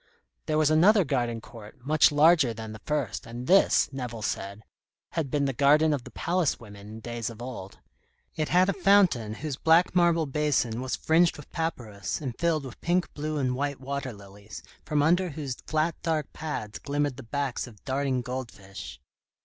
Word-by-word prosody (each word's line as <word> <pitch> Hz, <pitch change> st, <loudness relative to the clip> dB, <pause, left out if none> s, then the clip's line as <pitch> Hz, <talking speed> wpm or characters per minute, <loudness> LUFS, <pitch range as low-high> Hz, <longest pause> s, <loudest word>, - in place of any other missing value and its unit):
There 155 Hz, -, +1 dB
was 155 Hz, -1 st, +3 dB
another 190 Hz, +6 st, +5 dB
garden 120 Hz, -6 st, -1 dB
court, 110 Hz, +2 st, -12 dB
much 155 Hz, +2 st, +5 dB
larger 150 Hz, -5 st, +4 dB
than 110 Hz, 0 st, -7 dB
the 110 Hz, 0 st, -10 dB
first, 145 Hz, -9 st, -2 dB
and 120 Hz, +2 st, -7 dB
this, 195 Hz, +7 st, +5 dB
Nevill 120 Hz, -4 st, -5 dB
said, 100 Hz, +1 st, -4 dB, 0.5 s
had 160 Hz, -5 st, -2 dB
been 145 Hz, +1 st, 0 dB
the 135 Hz, -, -1 dB
garden 150 Hz, +4 st, +4 dB
of 135 Hz, -4 st, -3 dB
the -, -, -9 dB
palace 175 Hz, -3 st, 0 dB
women 105 Hz, -3 st, -12 dB
in 110 Hz, +1 st, -9 dB
days 120 Hz, 0 st, -4 dB
of 115 Hz, -1 st, -11 dB
old. 120 Hz, -6 st, -8 dB, 0.6 s
It 155 Hz, -1 st, -2 dB
had 180 Hz, +1 st, +4 dB
a 195 Hz, -, +1 dB
fountain 180 Hz, -, +3 dB
whose 145 Hz, -1 st, -5 dB
black 165 Hz, +3 st, +4 dB
marble 170 Hz, -2 st, +3 dB
basin 135 Hz, -5 st, 0 dB
was 130 Hz, -1 st, -2 dB
fringed 165 Hz, +2 st, +3 dB
with 150 Hz, -, -13 dB
papyrus, 120 Hz, -, -3 dB
and 130 Hz, -5 st, -5 dB
filled 160 Hz, -2 st, 0 dB
with 130 Hz, -, -10 dB
pink, 175 Hz, +1 st, 0 dB
blue, 155 Hz, +1 st, -3 dB
and 130 Hz, -3 st, 0 dB
white 140 Hz, +1 st, -2 dB
water 135 Hz, 0 st, -4 dB
lilies, 100 Hz, 0 st, -12 dB, 0.2 s
from 150 Hz, -1 st, +1 dB
under 180 Hz, +4 st, +3 dB
whose 140 Hz, -4 st, -5 dB
flat 155 Hz, +2 st, +1 dB
dark 160 Hz, -3 st, -2 dB
pads 120 Hz, -9 st, -5 dB
glimmered 145 Hz, -2 st, -1 dB
the -, -, -7 dB
backs 135 Hz, +1 st, -3 dB
of 105 Hz, -4 st, -16 dB
darting 135 Hz, -2 st, -1 dB
goldfish. 100 Hz, -, -7 dB
140 Hz, 180 wpm, -27 LUFS, 115-155 Hz, 0.6 s, another